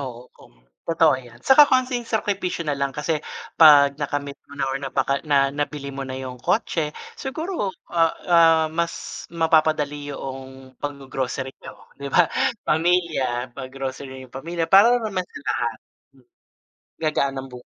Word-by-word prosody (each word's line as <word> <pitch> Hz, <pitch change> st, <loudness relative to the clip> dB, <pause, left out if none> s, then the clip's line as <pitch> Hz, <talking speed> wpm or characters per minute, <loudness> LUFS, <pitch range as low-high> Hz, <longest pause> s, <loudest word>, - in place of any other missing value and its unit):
Oo, 125 Hz, -4 st, -6 dB, 0.7 s
totoo 165 Hz, -2 st, +4 dB
'yan, 120 Hz, -1 st, -15 dB
'tsaka 265 Hz, +3 st, +8 dB
konting 255 Hz, -1 st, +2 dB
sakripisyo 195 Hz, -5 st, -1 dB
nalang 140 Hz, -2 st, -1 dB
kasi 150 Hz, +2 st, -1 dB, 0.5 s
'pag 145 Hz, -3 st, +8 dB
nakamit 145 Hz, -1 st, -3 dB
mo -, -, -14 dB
na 140 Hz, -, 0 dB
or -, -, -1 dB
napaka 140 Hz, 0 st, -1 dB
na 140 Hz, -1 st, +3 dB
nabili 145 Hz, -1 st, -4 dB
mo 135 Hz, -, -6 dB
na 130 Hz, -, -5 dB
yung 130 Hz, -1 st, -7 dB
kotse 160 Hz, -8 st, -1 dB, 0.2 s
siguro, 315 Hz, -, -3 dB, 0.2 s
ah, 165 Hz, -1 st, +3 dB
ah, 165 Hz, -2 st, +5 dB
mas 170 Hz, +1 st, -1 dB, 0.4 s
mapapadali 155 Hz, -3 st, +1 dB
yoong 135 Hz, -1 st, -8 dB
pag-gogrocery 135 Hz, -2 st, -4 dB
nyo, -, -, -13 dB
'di 140 Hz, -, -4 dB
ba? 175 Hz, +5 st, +5 dB, 0.4 s
Pamilya 155 Hz, -7 st, +1 dB
pag-grocery 130 Hz, 0 st, -7 dB
yung 130 Hz, -, -18 dB
pamilya 165 Hz, +5 st, -3 dB
para 200 Hz, +8 st, +6 dB
naman 210 Hz, -6 st, -2 dB
sa -, -, -10 dB
lahat. -, -, 0 dB, 1.4 s
Gagaan 140 Hz, -3 st, 0 dB
ang 135 Hz, 0 st, -5 dB
bu 125 Hz, -, -9 dB
145 Hz, 140 wpm, -23 LUFS, 135-170 Hz, 1.4 s, tsaka